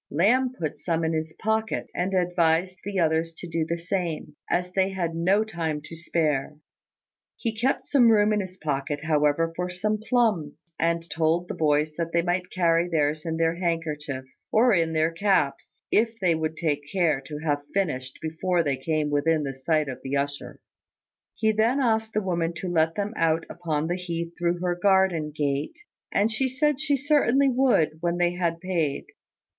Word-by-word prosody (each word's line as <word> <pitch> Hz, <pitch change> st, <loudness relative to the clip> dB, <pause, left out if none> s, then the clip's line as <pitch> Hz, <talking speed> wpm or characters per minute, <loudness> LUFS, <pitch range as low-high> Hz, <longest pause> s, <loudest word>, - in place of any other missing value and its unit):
Lamb 245 Hz, -, +2 dB
put 155 Hz, -3 st, -3 dB
some 165 Hz, +2 st, -1 dB
in 160 Hz, 0 st, 0 dB
his 160 Hz, 0 st, -2 dB
pocket, 220 Hz, +4 st, -1 dB
and 190 Hz, +2 st, -1 dB
advised 175 Hz, 0 st, +1 dB
the 200 Hz, 0 st, -4 dB
others 165 Hz, -1 st, +1 dB
to 175 Hz, -, -8 dB
do 165 Hz, -1 st, -1 dB
the 170 Hz, -, 0 dB
same, 170 Hz, -4 st, -3 dB
as 180 Hz, +1 st, 0 dB
they 190 Hz, +1 st, +1 dB
had 175 Hz, -4 st, -2 dB
no 185 Hz, +6 st, +2 dB
time 165 Hz, -8 st, -3 dB
to 165 Hz, -, -9 dB
spare. 155 Hz, -4 st, -1 dB, 0.8 s
He 225 Hz, -3 st, -3 dB
kept 250 Hz, +5 st, 0 dB
some 250 Hz, -5 st, +5 dB
room 215 Hz, -1 st, +4 dB
in 210 Hz, -, +1 dB
his 185 Hz, -2 st, -6 dB
pocket, 145 Hz, -1 st, -2 dB
however, 155 Hz, +1 st, +2 dB
for 180 Hz, +1 st, -2 dB
some 210 Hz, +4 st, -1 dB
plums; 195 Hz, -, 0 dB
and 165 Hz, 0 st, 0 dB
told 165 Hz, +2 st, +1 dB
the -, -, -4 dB
boys 150 Hz, 0 st, +1 dB
that 165 Hz, -1 st, -3 dB
they 170 Hz, 0 st, +3 dB
might 180 Hz, +1 st, -1 dB
carry 170 Hz, -1 st, +2 dB
theirs 155 Hz, -1 st, 0 dB
in 160 Hz, 0 st, -1 dB
their 165 Hz, 0 st, +2 dB
handkerchiefs, 150 Hz, -6 st, -4 dB
or 235 Hz, +2 st, +5 dB
in 165 Hz, -3 st, +2 dB
their 160 Hz, +1 st, +2 dB
caps, 165 Hz, -6 st, 0 dB
if 225 Hz, +1 st, +2 dB
they 180 Hz, -3 st, +3 dB
would 160 Hz, 0 st, -2 dB
take 150 Hz, -4 st, 0 dB
care 165 Hz, -7 st, +2 dB
to 150 Hz, -, -6 dB
have 145 Hz, -2 st, -1 dB
finished 130 Hz, -10 st, -2 dB
before 170 Hz, +2 st, 0 dB
they 140 Hz, -3 st, 0 dB
came 150 Hz, +2 st, -1 dB
within 150 Hz, +1 st, +2 dB
sight 150 Hz, +3 st, 0 dB
of 130 Hz, -, -5 dB
the 135 Hz, +1 st, -2 dB
usher. 145 Hz, +1 st, -4 dB, 0.8 s
He 220 Hz, -1 st, +2 dB
then 225 Hz, +5 st, +2 dB
asked 220 Hz, -3 st, +1 dB
the 215 Hz, -, 0 dB
woman 170 Hz, -2 st, -1 dB
to 185 Hz, -, -5 dB
let 165 Hz, -2 st, +1 dB
them 205 Hz, +1 st, -2 dB
out 165 Hz, -2 st, +1 dB
upon 160 Hz, -3 st, -2 dB
the 175 Hz, +2 st, -1 dB
heath 170 Hz, -2 st, -4 dB
through 175 Hz, 0 st, -1 dB
her 180 Hz, -1 st, +1 dB
garden 185 Hz, -4 st, +2 dB
gate; 145 Hz, -, -2 dB, 0.3 s
and 210 Hz, +3 st, +2 dB
she 260 Hz, +4 st, 0 dB
said 285 Hz, +2 st, +1 dB
she 300 Hz, -2 st, +1 dB
certainly 280 Hz, -1 st, +3 dB
would 245 Hz, -, +2 dB
when 170 Hz, 0 st, 0 dB
they 175 Hz, 0 st, +2 dB
had 170 Hz, -2 st, -1 dB
paid. 165 Hz, -6 st, -1 dB
170 Hz, 185 wpm, -26 LUFS, 155-195 Hz, 0.8 s, some